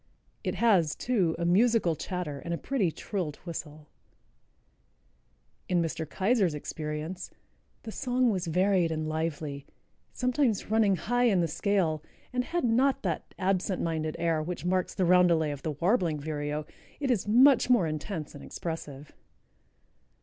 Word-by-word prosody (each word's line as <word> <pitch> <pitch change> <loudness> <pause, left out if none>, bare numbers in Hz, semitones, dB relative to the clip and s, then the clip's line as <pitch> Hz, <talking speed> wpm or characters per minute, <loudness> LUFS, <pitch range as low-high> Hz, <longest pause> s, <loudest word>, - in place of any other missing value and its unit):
It - - -2
has, 190 -10 +3
too, 195 -10 +1
a 170 - -2
musical 200 -1 +3
chatter 165 -4 -4
and 170 +3 -3
a - - -5
pretty 220 -9 0
trilled 170 -4 -4
whistle. 155 -3 -7 1.8
In 180 -1 +3
Mr. 160 -1 -2
Keyser's 195 -4 +1
experience 150 +4 -5 0.5
"the 225 - -6
song 250 0 +1
was 185 -3 -2
varied 180 0 +2
and 155 -1 -2
lively, 155 -3 -3 0.4
sometimes 250 -5 0
running 215 -3 +4
high 245 +8 +1
in 205 -6 +4
the 170 - +1
scale, 165 -2 0 0.3
and 250 0 0
had 345 +2 -2
not 250 +3 +2
that - - -3
absent 190 -1 0
minded 155 -2 -2
air 165 -2 +1
which 175 +3 -5
marks 185 0 0
the 190 - +1
roundelay 170 -3 +4
of 145 -2 -6
the 155 - -2
warbling 170 - +1
vireo. 150 0 -3 0.3
It 275 -3 0
is 210 -4 0
much 255 +4 +6
more 240 -8 +5
intense 155 +1 -4
and 145 - -10
expressive." 150 -4 -6
175 Hz, 145 wpm, -29 LUFS, 155-215 Hz, 1.8 s, much